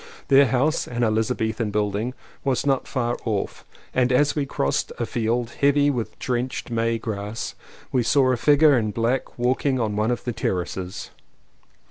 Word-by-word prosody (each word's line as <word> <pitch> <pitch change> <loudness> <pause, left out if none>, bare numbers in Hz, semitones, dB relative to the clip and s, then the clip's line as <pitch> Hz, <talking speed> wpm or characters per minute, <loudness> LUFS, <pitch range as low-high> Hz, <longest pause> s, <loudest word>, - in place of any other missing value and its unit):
Their 140 0 +7
house, 135 +5 +1
an 120 0 -2
Elizabethan 110 0 0
building, 105 +4 -1 0.3
was 135 -1 0
not 135 -2 +1
far 120 -3 -1
off, 105 -4 -2 0.3
and 130 0 +2
as 145 +3 +3
we 145 -2 -1
crossed 70 - -1
a - - -1
field, 115 +1 -1
heavy 145 +1 +4
with 120 -5 -4
drenched 125 0 -3
May 115 0 +1
grass, 105 -1 -4 0.4
we 130 - +2
saw 130 +2 +3
a - - +2
figure 145 +3 +5
in 110 -3 +1
black 115 +5 -1
walking 130 +2 +1
on 110 -3 -1
one 105 +2 +1
of 120 - -1
the 120 - -3
ter 110 -3 -1
races. 90 +1 -5
120 Hz, 165 wpm, -23 LUFS, 110-130 Hz, 0.4 s, Their